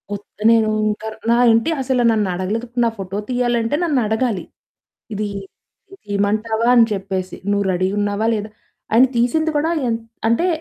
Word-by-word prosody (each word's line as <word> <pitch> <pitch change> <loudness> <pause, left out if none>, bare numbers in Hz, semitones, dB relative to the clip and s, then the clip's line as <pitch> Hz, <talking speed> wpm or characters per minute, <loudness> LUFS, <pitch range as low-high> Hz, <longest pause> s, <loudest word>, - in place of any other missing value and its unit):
ఉత్త 205 - -13
నేనూ 225 -1 +4 0.2
ఇంక 215 +1 -3 0.3
నా 235 - +5 0.2
ఇంటి 230 +9 +2
అసల 260 -1 0
నన్నడగలేదు 210 +2 -1 0.2
నా - - +3
ఫోటో 195 0 -5
తీయాలంటే 240 0 0
నన్నడగాలి. 235 - 0 0.7
ఇది 210 +1 -2 0.8
తీయమంటావా 215 +3 0
అని 235 -2 +7
చెప్పేసి 190 -2 -4 0.2
నువ్వు 200 0 +1
రడీగున్నావా 205 +3 -1
లేదా? 210 0 -3 0.4
ఆయన 240 +4 +7
తీసింది 315 +7 +1
కూడా 315 +3 +1 0.2
ఎన్ 230 -1 0 0.3
అంటే 235 +11 +2
220 Hz, 130 wpm, -19 LUFS, 205-240 Hz, 0.8 s, అని